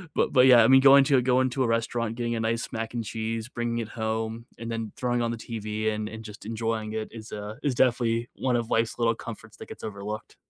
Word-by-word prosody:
but - - +1
but 130 -1 +6
yeah, 120 -3 +8
I - - +5
mean, 135 0 +7
going 140 0 +8
to 135 -1 +4
a - - +3
going 130 +1 +2
to 130 +1 0
a 120 - +1
restaurant, 115 0 -1
getting 120 -1 -2
a - - -2
nice 115 +1 -1
mac 115 +1 -4
and 120 -2 -2
cheese, 115 +1 -4
bringing 120 -1 -2
it 115 - -3
home, 110 0 -3
and 115 0 -6
then 115 -1 -4
throwing 120 -1 0
on 115 - 0
the 115 - -4
TV 110 -1 -3
and 105 0 -3
and 110 0 -8
just 105 -1 -10
enjoying 110 -1 -2
it 110 0 -3
is, 110 -1 -10
uh, 105 +1 -6
is 140 -4 0
definitely 120 -2 +2
one 130 -2 0
of 120 -1 -1
life's 115 0 +1
little 115 -1 +2
comforts 110 -1 -10
that - - -10
gets - - -10
overlooked. 105 0 -6
115 Hz, 250 wpm, -26 LUFS, 110-120 Hz, -, yeah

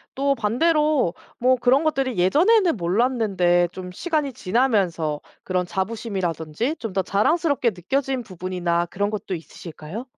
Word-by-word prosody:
또 275 +1 +2
반대로 300 - +2 0.3
뭐 255 +1 +4
그런 255 +5 +3
것들이 270 -7 0
예전에는 335 - +4
몰랐는데 185 -3 +2
좀 180 0 -8
시간이 300 - -2
지나면서 185 - 0 0.2
그런 180 -1 -1
자부심이라든지 190 - -3
좀 225 -5 -5
더 190 - +3
자랑스럽게 280 - +1
느껴진 260 +8 -2
부분이나 180 -3 -2
그런 200 +4 -2
것도 205 -3 -4
있으실까요? 165 +5 -9
215 Hz, 340 characters per minute, -23 LUFS, 180-270 Hz, 0.3 s, 뭐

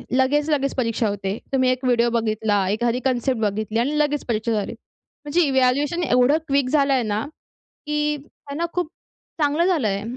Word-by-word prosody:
लगेच, 290 +4 +2
लगेच 275 -2 0
परीक्षा 230 -3 0
होते. 200 +1 -3 0.2
तुम्ही 260 -1 +3
एक 255 +1 -3
व्हिडिओ 240 -1 +3
बघितला, 215 -4 0
एखादी 235 +4 0
कन्सेप्ट 250 -1 0
बघितली 215 +2 -1
आणि 290 +5 0
लगेच 295 -1 0
परीक्षा 230 0 -1
झाली. 210 +1 -2 0.5
म्हणजे 325 +5 +2
इव्हॅल्युएशन 275 +6 +1
एवढं 250 +2 +4
क्वीक 275 -2 +1
झालं 280 -2 +3
आहे 255 -3 +2
ना, 215 +2 -2 0.6
की 300 0 0
त्यांना 295 +2 -6
खूप 355 -3 -1 0.5
चांगलं 300 +4 +2
झालं 325 - +2
आहे, 200 +1 -1
255 Hz, 165 wpm, -22 LUFS, 225-290 Hz, 0.6 s, एवढं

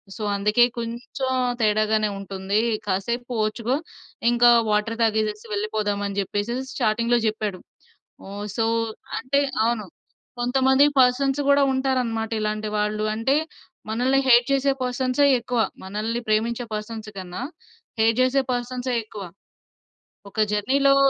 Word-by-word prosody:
So, 215 - -6
అందుకే 210 +4 +3 0.2
కొంచం 240 +3 -4 0.3
తేడాగానే 215 0 +2
ఉంటుందీ. 195 +1 -2 0.3
కాసేపు 235 +6 -2 0.2
ఓర్చుకో, 230 +4 -1 0.6
ఇంకా 240 0 +6 0.2
వాటర్ 210 +2 0
తాగేసేసి 215 -1 0
వెళ్ళిపోదాం." 205 0 -1
అని 200 0 -6
జెప్పేసి 205 +4 -2 0.3
చాటింగ్‌లో 235 +2 +2
జెప్పాడు. 210 -3 -2 0.7
హ్మ్. 200 +1 -6
సో, 225 - +2 0.5
అంటే 275 +4 +1 0.2
అవును. 230 -4 -1 0.5
కొంతమంది 265 +3 +4 0.2
పర్సన్స్ 270 +2 +2
గూడా 280 0 +5
ఉంటారనమాట 250 -4 -1
ఇలాంటి 215 0 -2
వాళ్ళు. 210 +1 -1
అంటే, 265 +5 +2 0.5
మనల్ని 250 +5 +1
హేట్ 240 -1 +6
చేసే 275 0 +3
పర్సన్సే 255 +2 +1
ఎక్కువ, 240 0 -2 0.2
మనల్ని 215 +5 -3
ప్రేమించే 230 +3 0
పర్సన్స్ 215 0 -5
కన్నా, 185 +2 -6 0.6
హేట్ 225 +1 +3
జేసే 260 +1 +3
పర్సన్సే 245 +1 -2
ఎక్కువ. 215 -2 -9 1.1
ఒక 215 +2 +2
జర్నీ‌లో 275 +6 +3
230 Hz, 115 wpm, -23 LUFS, 210-250 Hz, 1.1 s, ఇంకా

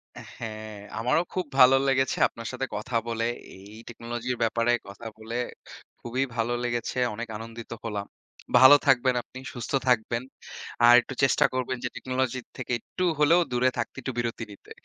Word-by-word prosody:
হ্যাঁ, 110 -1 -8 0.2
আমারও 125 +9 +2
খুব 185 -2 -1
ভালো 130 0 +8
লেগেছে 135 -1 +2
আপনার 115 -1 -9
সাথে 130 +1 -3
কথা 110 +4 -5
বলে, 115 0 -1 0.3
এই 100 +3 -13
টেকনোলজির 120 +1 -4
ব্যাপারে 115 +1 +1 0.2
কথা 100 +3 -9
বলে 110 +1 -7 0.6
খুবই 125 +3 -2
ভালো 115 +1 0
লেগেছে! 120 0 -2 0.2
অনেক 115 +2 -5
আনন্দিত 115 +1 -9
হলাম। 105 -3 -3 0.5
ভালো 130 +2 +10
থাকবেন 130 -1 +4
আপনি, 130 - -11
সুস্থ 120 -2 -6 0.2
থাকবেন। 115 0 +1 0.6
আর 120 - +9
একটু 135 - -8
চেষ্টা 135 - +4
করবেন 130 0 -2
যে 125 - -1
টেকনোলজির 130 -1 -2
থেকে 125 -1 -5
একটু 185 - -5 0.2
হলেও 165 +4 +5
দূরে 125 +1 +3
থাকতে, 115 - -3
একটু 130 - -3
বিরতি 115 -1 -2
নিতে। 100 - -15
120 Hz, 160 wpm, -26 LUFS, 115-130 Hz, 0.6 s, ভালো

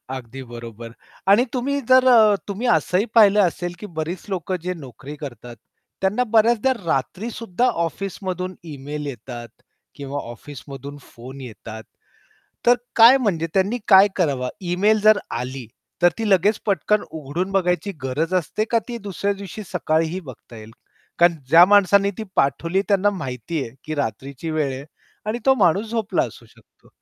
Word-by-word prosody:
अगदी 130 +1 -8
बरोबर 115 -1 -9 0.4
आणि 240 +6 +5
तुम्ही 275 +3 -1
जर 255 0 +6
अ, 220 -4 +6
तुम्ही 210 +5 -3
असंही 195 -3 +2
पाहिलं 210 -2 +6
असेल 175 -1 -1
की - - -7
बरीच 165 +3 -4
लोक 185 -1 -3
जे 180 0 -2
नोकरी 140 -1 -10
करतात. 125 -5 -9 0.5
त्यांना 205 +6 +1
बऱ्याचदा 230 +3 +4
रात्रीसुद्धा 215 - -2 0.2
ऑफिसमधून 185 0 -5 0.2
इमेल 145 +2 -6
येतात 120 -2 -8 0.5
किंवा 140 0 -5
ऑफिसमधून 140 +2 -10
फोन 130 +4 -12
येतात. 110 -2 -9 0.8
तर 245 - +7 0.2
काय 235 +3 +9
म्हणजे 175 -9 0
त्यांनी 195 +5 +1
काय 195 0 +8
करावं? 140 -8 0
ईमेल 195 +4 +2
जर 215 0 +6
आली, 130 0 -5 0.4
तर 175 - +8
ती 225 - -1
लगेच 200 +3 +3
पटकन 210 +1 +1
उघडून 160 +6 -4
बघायची 180 0 0
गरज 155 +7 -1
असते 185 +4 0
का, 230 - +4
ती 235 -1 -5
दुसऱ्या 200 0 -2
दिवशी 200 +2 -8
सकाळीही 160 +3 -1
बघता 130 -5 -12
येईल? 110 0 -11 0.5
कारण 170 0 +5
ज्या 165 +3 +8
माणसाने 200 0 +4
ती - - -3
पाठवली 165 +7 +1
त्यांना 200 0 +3
माहिती 135 - -4
आहे 115 0 -8
की 155 - -4
रात्रीची 140 +3 -4
वेळ 155 -3 -1
आहे 135 +2 -8 0.4
आणि 225 +3 -1
तो 265 - +6
माणूस 190 +6 +2
झोपला 225 -3 0
असू - - -11
शकतो. - - -25
180 Hz, 150 wpm, -22 LUFS, 140-205 Hz, 0.8 s, काय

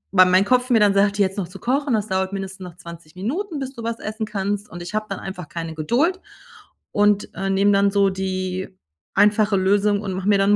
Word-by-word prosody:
weil 185 0 +8
mein 185 +2 +4
Kopf 255 +1 +2
mir 235 -3 +5
dann 205 -1 +4
sagt: 200 +1 +2
„Jetzt 195 -1 +1
noch 180 - -3
zu 180 +3 -11
kochen, 265 +2 0
das 210 - -1
dauert 190 0 -1
mindestens 195 0 -5
noch 180 -2 -9
20 170 -2 -12
Minuten, 310 - -3
bis 265 0 -5
du 235 - -9
was 230 0 -3
essen 215 0 -4
kannst.“ 205 0 -3
Und 175 0 -8
ich 175 - -8
habe 215 0 -1
dann 195 - -4
einfach 180 -5 -7
keine 165 0 -5
Geduld 255 - +1 0.7
und, 205 0 +2
äh, 195 0 -2
nehme 195 +1 +3
dann 200 0 +4
so 200 -1 +3
die 185 0 -3 0.5
einfache 210 0 +4
Lösung 205 +2 +2
und 195 -3 -4
mache 190 +1 -4
mir 205 - +5
dann 195 +1 +3
200 Hz, 225 wpm, -22 LUFS, 190-215 Hz, 0.7 s, weil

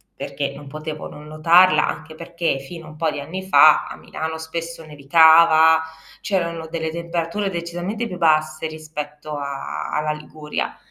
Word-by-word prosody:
perché 140 -1 -4
non 145 0 -11
potevo 155 +1 -7
non 150 +1 -12
notarla. 170 +4 +4
Anche 155 +1 -6
perché 170 -3 -2
fino 165 +4 -10
a - - -10
un 155 - -13
po' 160 0 0
di - - -5
anni 175 +7 -6
fa, 155 -5 +6
a - - -8
Milano 160 0 -6
spesso 165 +1 -6
nevicava, 160 +2 +5 0.4
c'erano 170 -4 -2
delle 160 -1 -3
temperature 170 +4 -3
decisamente 175 +6 -4
più 180 -3 -7
basse 155 -1 +1
rispetto 150 -1 -7
a 140 -1 -5
alla 150 0 -1
Liguria. 150 0 -5
160 Hz, 155 wpm, -21 LUFS, 150-170 Hz, 0.4 s, fa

